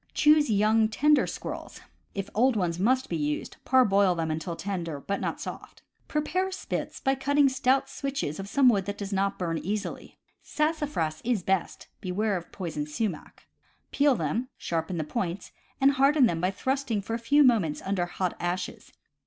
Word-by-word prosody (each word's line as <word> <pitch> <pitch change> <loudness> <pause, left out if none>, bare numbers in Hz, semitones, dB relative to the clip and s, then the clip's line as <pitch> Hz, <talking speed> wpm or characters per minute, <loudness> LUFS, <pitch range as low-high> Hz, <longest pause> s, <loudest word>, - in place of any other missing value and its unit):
Choose 300 -2 +5
young, 215 +1 +3
tender 295 +7 +3
squirrels - - -6 0.4
(if 195 0 -3
old 250 +3 +3
ones 175 -4 -1
must 255 +6 +2
be 170 - -3
used, 150 -1 -2
parboil 200 -8 +4
them 165 -1 -1
until 160 +2 -3
tender 170 -6 -4
but 200 +7 -3
not - - -2
soft). - - -8 0.2
Prepare 365 +6 -1
spits 380 - -4
by 270 - +1
cutting 280 +1 +3
stout 260 +1 +2
switches 270 - -3
of 195 +1 -6
some 275 +2 +4
wood 200 -6 +4
that 205 +1 -4
does 200 0 -5
not 195 0 0
burn 165 -3 -2
easily 205 +3 -4 0.2
(sassafras 295 - -1
is 230 -6 0
best 190 -1 -1
— - - -45
beware 200 +3 -1
of 175 -2 -6
poison 155 -5 -4
sumach), 170 +2 -4 0.5
peel 285 -2 +3
them, 225 - -2
sharpen 165 +1 -2
the 160 - -1
points, 170 +4 -4 0.3
and 275 0 +5
harden 275 +1 +4
them 165 -7 0
by 180 - +2
thrust 265 +7 -2
ing 210 -3 0
for 225 - -5
a 230 - -1
few 285 +6 +4
moments 210 - +3
under 190 -2 0
the 175 - -13
hot 185 -2 -1
ashes. 175 +2 -4
205 Hz, 180 wpm, -27 LUFS, 175-265 Hz, 0.5 s, Choose